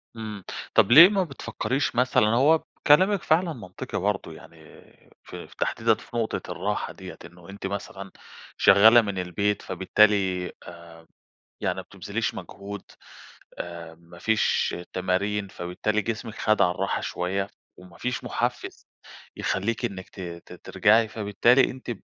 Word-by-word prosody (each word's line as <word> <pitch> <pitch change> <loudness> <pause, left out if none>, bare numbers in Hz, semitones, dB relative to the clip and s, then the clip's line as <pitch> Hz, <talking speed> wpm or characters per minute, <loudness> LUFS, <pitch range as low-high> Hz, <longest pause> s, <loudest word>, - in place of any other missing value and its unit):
امم. 105 -4 -7 0.3
طَب 100 - +4
ليه 165 +8 +11
ما 195 -3 +1
بتفكّريش 135 -3 -3
مثلًا 125 -3 +3
هو 140 +8 +3 0.2
كلامِك 185 +6 +5
فعلًا 165 +1 +2
منطقي 95 -7 -7
برضه - - -2
يعني - - -15 0.7
في - - -10
في - - -19
تحديدًا - - +1
في 120 - -9
نقطة 115 -1 -3
الراحة - - -3
دِيَّة، - - -10
إنه 85 +1 -15
أنتِ 95 0 -6
مثلًا 100 -1 -7 0.5
شغّالة 110 +4 +7
من 100 -4 -4
البيت 100 +3 -1
فبالتالي، 95 -1 +1
آآ، 85 -1 -13 0.5
يعني - - -1
ما - - -5
بتبذليش - - -4
مجهود، 100 0 -8 0.8
أ 85 -1 -7
ما 85 +1 -17
فيش 110 +4 +1 0.2
تمارين 100 +2 -1
فبالتالي 95 +5 -2
جسمِك 110 +1 -5
خَد 110 0 +1
على 90 - +4
الراحة 95 +2 -2
شويّة 95 +2 -2 0.3
وما 90 -1 -15
فيش 125 -1 -3
محفّز - - -4 0.5
يخلّيكِ 115 +6 -1
إنِّك 95 -4 -6
ت - - -15
ت 85 0 -9
ترجَعي، 100 +5 +2
فبالتالي 110 +5 +2
أنتِ 130 -1 -7
100 Hz, 140 wpm, -25 LUFS, 90-115 Hz, 0.8 s, ليه